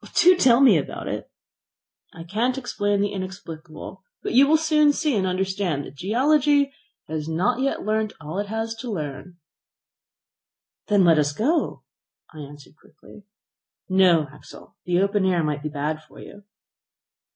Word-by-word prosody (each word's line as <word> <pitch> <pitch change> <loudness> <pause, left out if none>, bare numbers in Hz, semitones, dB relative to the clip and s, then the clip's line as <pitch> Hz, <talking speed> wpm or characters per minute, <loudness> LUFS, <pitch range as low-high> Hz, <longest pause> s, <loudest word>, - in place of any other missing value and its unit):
"Do 365 +1 +6
tell 260 -6 +4
me 240 -10 +7
all - - -2
about - - -8
it." - - -5 0.8
"I 165 - -10
can't 225 +9 -1
explain 205 -6 -1
the 205 0 0
inexplicable, 185 -2 -8 0.2
but - - -3
you 270 +3 +6
will 315 +2 +5
soon 305 -2 +3
see 300 -3 0
and 190 -2 0
understand 185 -5 -2
that - - -11
geology 280 - +2 0.3
has 155 0 -4
not 185 +10 0
yet 275 -6 -1
learnt 215 0 -1
all 160 +5 -5
it 205 - -3
has 225 +1 -3
to 245 - -6
learn." 170 -1 -6 1.5
"Then 205 -3 +4
let 165 -2 +5
us 145 0 +1
go," 300 - -1 0.5
I 155 - -11
answered 145 +1 -12
quickly. 205 - -18 0.6
"No, 180 -5 +4
Axel; - - -15
the 180 0 +1
open 200 +1 +1
air 180 -3 +1
might 150 -1 -2
be 155 - -4
bad 150 +1 -3
for 155 - -17
you." 205 0 -13
195 Hz, 160 wpm, -23 LUFS, 160-240 Hz, 1.5 s, me